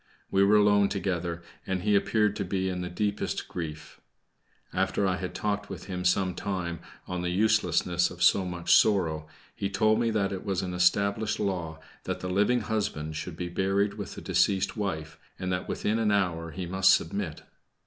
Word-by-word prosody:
We 95 - +4
were 100 +2 +5
alone 105 -1 +5
together, 85 -3 -2 0.2
and 95 -1 -1
he 105 0 +2
appeared 105 0 +2
to 100 - -1
be 95 0 -1
in 90 -1 -3
the 90 - -4
deepest 100 +3 -2
grief. 80 -3 -7 0.7
After 100 - +1
I 95 -1 +1
had 90 -1 -5
talked 105 -1 -2
with - - -7
him 90 -2 -5
some 95 +1 +2
time 90 -3 -3 0.3
on 90 -1 -3
the 90 - -1
uselessness 90 -3 +2
of 90 0 -4
so 95 - +5
much 90 -2 0
sorrow, 80 -8 +2 0.3
he 100 - -2
told 110 +2 +2
me 120 -1 +2
that 105 -3 0
it 95 -2 -4
was 95 -2 -1
an 90 -1 -4
established 100 +4 +2
law 90 -6 -2 0.3
that - - -3
the 90 - -4
living 105 +6 +2
husband 90 -8 -2
should 80 +1 -5
be 90 - -3
buried 95 +3 0
with 100 -2 -7
the - - -8
deceased 95 -2 +1
wife, 80 -7 -4 0.2
and 90 0 -3
that 90 0 -2
within 110 +2 0
an 110 -2 +2
hour 90 -5 0
he 90 +3 -5
must 95 +2 +4
submit. 85 -1 -4
95 Hz, 190 wpm, -28 LUFS, 90-100 Hz, 0.7 s, were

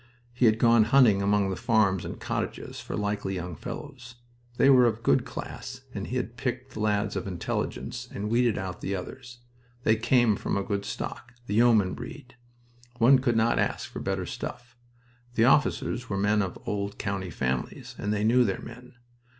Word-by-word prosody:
He 120 0 +3
had 110 0 +4
gone 115 -2 +5
hunting 115 -5 +5
among 100 -1 +2
the - - -2
farms 100 -6 +2
and - - -6
cottages - - -4
for - - -6
likely 105 -2 -2
young 90 -1 -5
fellows. 125 - -8 0.4
They - - +5
were 130 -3 +7
of 115 0 -2
good - - +3
class, 130 0 -7
and 100 -1 -4
he 125 - -4
had 120 -1 -3
picked 125 +1 -3
the - - -7
lads 105 -1 0
of 95 - -3
intelligence, 90 -3 -4
and 100 +1 -4
weeded 120 0 +2
out 95 -2 -5
the 100 - -2
others. 120 +6 -8 0.4
They 110 - +4
came 115 -1 +3
from - - -2
a 100 - -1
good 100 0 -2
stock 125 - -6
the 105 - -4
yeoman 110 -4 +4
breed. 125 +1 -9 0.6
One 125 +3 +6
could 120 -3 +1
not 115 +1 +2
ask - - -1
for - - -6
better - - -2
stuff. 120 -1 -7 0.6
The 115 - +4
officers 130 -2 +2
were 100 - -1
men 105 +2 +2
of 95 -3 -3
old 100 0 -3
county 95 -2 -3
families, 65 -5 -3
and 105 - -2
they 105 0 0
knew 120 +3 +5
their 100 -5 -1
men. 125 +2 -11
110 Hz, 185 wpm, -27 LUFS, 100-125 Hz, 0.6 s, were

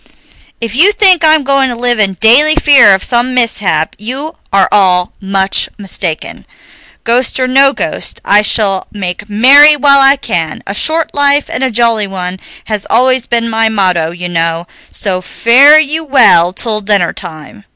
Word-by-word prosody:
If 230 -2 -6
you 340 - +4
think 380 -5 +3
I'm 310 -1 +3
going 275 -1 0
to 245 - -5
live 240 -1 -1
in 195 -2 +1
daily 265 +10 +4
fear 280 -10 +4
of 190 - -6
some 245 +1 -1
mishap, 200 -10 -1
you 265 +9 -7 0.2
are 195 -1 +1
all 180 -3 +1
much 195 0 -2
mistaken. 190 -5 -6 0.6
Ghost 245 +2 0
or 255 - -1
no 270 +2 +2
ghost, - - -5
I 205 +1 +3
shall 200 -2 0
make 195 0 -7
merry 280 +8 +5
while 280 -1 +2
I 270 +1 +4
can; 175 - -5
a 200 - -6
short 320 +9 -1
life 285 0 0
and 265 - -3
a 260 - 0
jolly 230 -3 0
one 185 -1 -7 0.3
has 210 -2 -5
always 255 +1 0
been 230 -1 -1
my 225 0 -1
motto, 185 -6 -1
you 175 +1 -8
know, 165 -1 -3 0.2
so 185 -3 -4
fare 265 +10 +3
you 310 +1 -1
well 250 - +3
till 215 +2 -2
dinnertime." 195 -1 -4
225 Hz, 165 wpm, -10 LUFS, 195-275 Hz, 0.6 s, merry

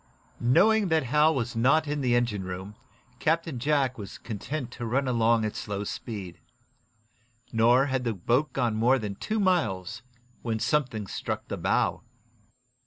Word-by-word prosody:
Knowing 195 - +4
that 160 -3 +2
Hal 150 +5 +3
was 120 -2 -2
not 145 +7 +3
in 145 0 -2
the 125 -2 +2
engine 120 -5 0
room, 95 +2 -6 0.5
Captain 160 -4 0
Jack 135 -2 +1
was 100 -2 -8
content 125 +5 -5
to - - -8
run 135 +4 0
along 115 -2 +2
at 105 - -3
slow 105 -1 -4
speed. 100 -4 -6 1.1
Nor 120 +4 +5
had 130 -2 -1
the 115 -3 -1
boat 120 - +1
gone 120 -4 0
more 120 +5 +3
than 105 -5 -4
two 215 - -3
miles 115 - 0 0.4
when 115 -2 -2
something 120 -3 0
struck - - -4
the - - -3
bow. - - +1
120 Hz, 155 wpm, -27 LUFS, 110-150 Hz, 1.1 s, Nor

